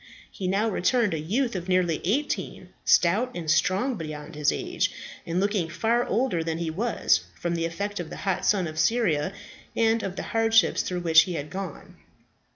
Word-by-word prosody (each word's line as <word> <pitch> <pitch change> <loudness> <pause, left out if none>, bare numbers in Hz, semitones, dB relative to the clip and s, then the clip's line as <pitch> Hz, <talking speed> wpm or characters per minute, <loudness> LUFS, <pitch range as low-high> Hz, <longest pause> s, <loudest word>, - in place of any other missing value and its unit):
He 190 - -4
now 200 +4 +1
returned 220 +1 +1
a 160 - -2
youth 230 - -1
of 180 0 -4
nearly 180 -3 +2
eighteen, 260 - -2
stout 200 +9 +3
and 165 -3 -1
strong 190 +10 +1
beyond 155 -3 -7
his 150 -1 +2
age, - - -1 0.4
and 170 +2 0
looking 200 -4 0
far 230 +7 0
older 210 -8 0
than 165 0 -2
he 165 -1 -2
was, 225 +8 +1
from 170 0 -1
the 165 -1 -1
effect 200 +5 -4
of 170 -3 -5
the - - -8
hot 190 -1 0
sun 195 -4 +2
of 155 -1 -5
Syria 185 -7 +2 0.4
and 225 0 +2
of 190 -3 -4
the - - -4
hardships 225 0 +3
through 180 -1 -3
which 165 -1 +7
he 175 - -3
had 150 0 -5
gone. 190 -4 -7
185 Hz, 185 wpm, -26 LUFS, 165-225 Hz, 0.4 s, which